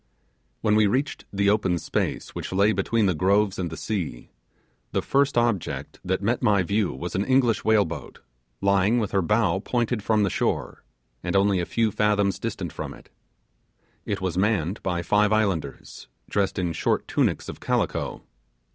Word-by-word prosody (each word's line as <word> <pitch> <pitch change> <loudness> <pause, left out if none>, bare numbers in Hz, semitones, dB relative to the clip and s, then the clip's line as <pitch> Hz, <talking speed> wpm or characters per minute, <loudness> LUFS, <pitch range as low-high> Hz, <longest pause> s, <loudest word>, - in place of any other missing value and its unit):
When 105 -2 +2
we 110 -1 +5
reached 130 +8 -1
the 100 0 +2
open 95 -4 +1
space - - -2
which - - -5
lay 100 +3 +3
between 115 0 +1
the 95 - +3
groves 100 +4 +2
and 90 -2 -2
the 80 - -7
sea, 90 - -4 0.6
the - - +1
first 140 -1 +2
object 120 -6 -1
that 95 +1 -1
met 120 +4 +1
my 105 -6 +3
view 100 +2 0
was 85 +7 -6
an 95 - 0
English 125 -3 +2
whale 110 -1 +4
boat, 85 - -8 0.4
lying 100 +3 +3
with 110 -4 -1
her 95 - +2
bow 105 +2 +2
pointed 120 +1 -1
from 105 0 +2
the 100 - +1
shore, - - -2 0.4
and 90 +2 -2
only 100 -1 +3
a 85 - -2
few 115 -2 +1
fathoms 105 -2 +1
distant - - -4
from - - -6
it. - - -18 0.9
It - - -3
was 95 -1 -1
manned 100 -3 0
by 90 -2 -2
five 105 +3 +3
islanders, 95 -10 -2 0.2
dressed 100 -1 0
in 90 -3 -1
shirt - - 0
tunics - - 0
of - - -7
calico. - - -1
100 Hz, 175 wpm, -25 LUFS, 95-110 Hz, 0.9 s, we